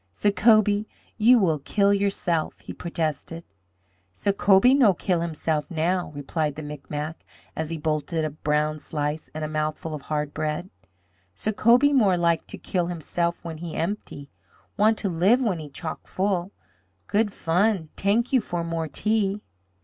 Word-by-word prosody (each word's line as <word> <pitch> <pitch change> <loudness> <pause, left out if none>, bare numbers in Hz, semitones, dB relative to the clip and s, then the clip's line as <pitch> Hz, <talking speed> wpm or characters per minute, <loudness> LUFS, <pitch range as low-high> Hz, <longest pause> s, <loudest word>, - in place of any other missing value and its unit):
"Sacobie, 210 - +3 0.3
you 240 +4 +7
will 165 -8 +2
kill 200 +7 +2
yourself!" 195 -5 -1
he - - -8
protested. 165 -1 -4 0.7
"Sacobie 200 - +4
no 225 -9 +5
kill 175 -2 0
himself 155 -3 -2
now," 175 +1 -1
replied 150 +1 -2
the 155 - -6
Micmac, 150 +2 -6 0.3
as 160 -1 -3
he 165 - -2
bolted 155 +1 -1
a 155 - -2
brown 150 +1 0
slice 150 +1 -3
and 155 - -3
a - - -3
mouthful 155 +1 -3
of 150 - -5
hard 150 0 -3
bread. 155 +4 -3 0.6
"Sacobie 235 +6 +3
more 205 -9 +4
like 170 -1 +1
to - - -7
kill 175 -2 -1
himself 170 0 -2
when 160 -2 -6
he 170 -1 -6
empty. 165 -6 -4 0.4
Want 215 +2 +3
to 205 - -2
live 195 +9 +3
when 195 -8 0
he 150 -2 -8
chock 160 +3 -6
full. 190 -1 -1 0.5
Good 210 0 +1
fun. 180 -1 +1
T'ank 225 +6 +1
you 255 - +5
for 175 -4 -3
more 165 -1 -2
tea." 210 +5 0
170 Hz, 150 wpm, -25 LUFS, 155-200 Hz, 0.7 s, you